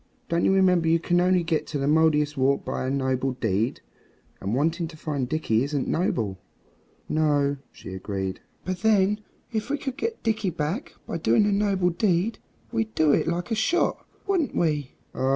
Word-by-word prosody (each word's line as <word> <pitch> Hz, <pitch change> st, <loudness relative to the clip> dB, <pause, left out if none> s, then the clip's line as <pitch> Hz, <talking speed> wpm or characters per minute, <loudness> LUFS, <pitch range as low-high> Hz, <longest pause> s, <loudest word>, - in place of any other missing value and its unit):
Don't 170 Hz, 0 st, +1 dB
you -, -, +4 dB
remember 185 Hz, -3 st, +4 dB
you 165 Hz, +1 st, +5 dB
can 175 Hz, +1 st, +1 dB
only 180 Hz, -1 st, +3 dB
get 165 Hz, -2 st, -2 dB
at -, -, +1 dB
the 135 Hz, -, 0 dB
Mouldiestwarp 150 Hz, -3 st, +2 dB
by 130 Hz, -, -2 dB
a -, -, 0 dB
noble 130 Hz, -1 st, 0 dB
deed? 110 Hz, -1 st, -1 dB, 0.6 s
And 100 Hz, +4 st, -2 dB
wanting 165 Hz, +5 st, 0 dB
to 160 Hz, -1 st, -12 dB
find 140 Hz, -5 st, -3 dB
Dickie 130 Hz, -7 st, +1 dB
isn't 140 Hz, -1 st, -2 dB
noble." 110 Hz, -, 0 dB, 0.7 s
"No," 145 Hz, -2 st, +2 dB
she 95 Hz, -, -10 dB
agreed; 95 Hz, 0 st, -4 dB, 0.3 s
"but 185 Hz, -1 st, -2 dB
then 210 Hz, 0 st, +3 dB, 0.3 s
if 220 Hz, +2 st, -2 dB
we 290 Hz, -, 0 dB
could 270 Hz, -2 st, -5 dB
get 455 Hz, 0 st, -3 dB
Dickie 220 Hz, -3 st, +1 dB
back 165 Hz, -, -3 dB
by 165 Hz, -, -4 dB
doing 120 Hz, -, +3 dB
a 205 Hz, -, +2 dB
noble 200 Hz, -3 st, +2 dB
deed 185 Hz, +3 st, +1 dB, 0.3 s
we'd 225 Hz, -2 st, -2 dB
do 155 Hz, -2 st, +4 dB
it -, -, +2 dB
like 175 Hz, +6 st, -2 dB
a -, -, +3 dB
shot, 325 Hz, +11 st, +1 dB, 0.2 s
wouldn't 375 Hz, -7 st, 0 dB
we?" 150 Hz, -5 st, 0 dB, 0.2 s
"Oh! 130 Hz, -, 0 dB
160 Hz, 180 wpm, -25 LUFS, 140-195 Hz, 0.7 s, you